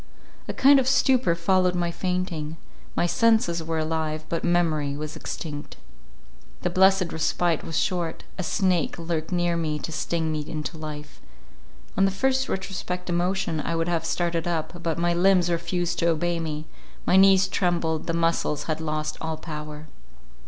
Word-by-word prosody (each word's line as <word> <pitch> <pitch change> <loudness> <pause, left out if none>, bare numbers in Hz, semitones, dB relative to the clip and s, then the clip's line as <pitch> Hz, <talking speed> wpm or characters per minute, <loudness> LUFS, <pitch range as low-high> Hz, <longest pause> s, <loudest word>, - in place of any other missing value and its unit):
A - - -3
kind 275 +1 +6
of 260 - 0
stupor 260 -8 +3
followed 180 +1 +2
my 175 -1 0
fainting; 175 -4 -3 0.4
my - - +2
senses 220 -5 +2
were 160 0 -2
alive, 155 -1 -2
but 165 - -2
memory 155 -5 +1
was 155 +1 -5
extinct. 150 -2 -6 0.9
The - - 0
blessed 190 -1 +4
respite 165 +1 +1
was 160 - -3
short—a 175 +1 -2
snake 180 -1 +1
lurked 165 -1 -3
near 175 -1 +1
me 155 -2 -1
to 150 - -6
sting 160 0 -1
me 155 - -1
into 155 +2 -4
life—on - - -6
the - - +4
first 265 +7 +1
retrospective 180 -2 -3
emotion 175 -2 0
I 165 - -2
would 165 0 0
have 165 -2 0
started 170 0 -1
up, 170 +1 -3
but 165 -2 -1
my 170 0 +1
limbs 180 0 +4
refused 170 +1 -1
to 170 - +2
obey 170 +1 0
me; 155 -1 -4 0.4
my - - +3
knees 190 0 +6
trembled, 170 -4 0
the 165 - 0
muscles 165 -3 0
had 160 -1 -3
lost 155 -1 -2
all 160 -1 -3
power. 150 -1 -7
170 Hz, 160 wpm, -25 LUFS, 155-180 Hz, 0.9 s, kind